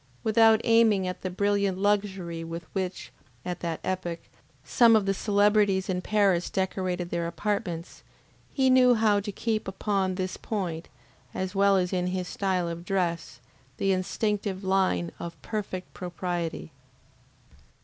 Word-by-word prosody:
Without 225 0 +5
aiming 225 -5 +4
at 180 - -5
the 185 - -3
brilliant 200 0 0
luxury 195 -4 -1
with 165 +1 -6
which, 190 -2 -4 0.3
at 180 -1 -4
that 165 -2 -3
epoch, 180 -2 -2 0.5
some 235 -2 +5
of 215 -3 +3
the 195 - +1
celebrities 205 -1 +2
in 180 -1 -1
Paris 195 -4 +2
decorated 185 -2 -2
their 170 -1 -1
apartments, 175 -3 -3 0.5
he 265 -2 +2
knew 250 -1 +6
how 215 -2 +3
to 205 +1 -5
keep 220 +2 -2
upon 190 -1 -1
this 185 0 -3
point, 175 -6 -4 0.5
as 185 0 -3
well 200 0 +4
as 180 0 0
in 180 -1 0
his 180 0 -2
style 185 -3 -1
of 170 0 -5
dress, 170 -8 -2 0.4
the 195 - +1
instinctive 195 +1 -1
line 190 -2 +1
of 170 0 -7
perfect 195 -4 -5
propriety. 175 -2 -4
190 Hz, 140 wpm, -27 LUFS, 180-205 Hz, 0.5 s, knew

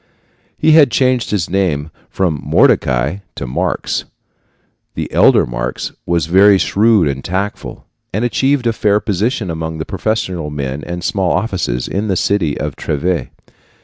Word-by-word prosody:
He 160 - +3
had 155 -3 +7
changed 125 0 +1
his 100 -6 -1
name 85 -6 -1 0.2
from 85 -7 -1
Mordecai 65 +7 +2 0.2
to - - -5
Marx. 60 - -2 0.9
The - - -4
elder - - +5
Marx - - -4 0.2
was 85 -3 +1
very 95 +4 +5
shrewd 105 -2 +3
and 70 -1 -3
tactful, 95 +3 -4 0.3
and 105 +5 -1
achieved 135 +2 +1
a 115 - +2
fair 105 -1 +2
position 105 0 -1
among 80 0 -4
the 80 - -4
professional 95 -5 -2
men 70 -1 -4
and 85 0 -5
small 95 -3 +1
officials 90 - -2
in 105 +3 -2
the 95 - 0
city 85 -6 0
of - - -3
Treves. 85 +4 -2
95 Hz, 145 wpm, -16 LUFS, 75-105 Hz, 0.9 s, had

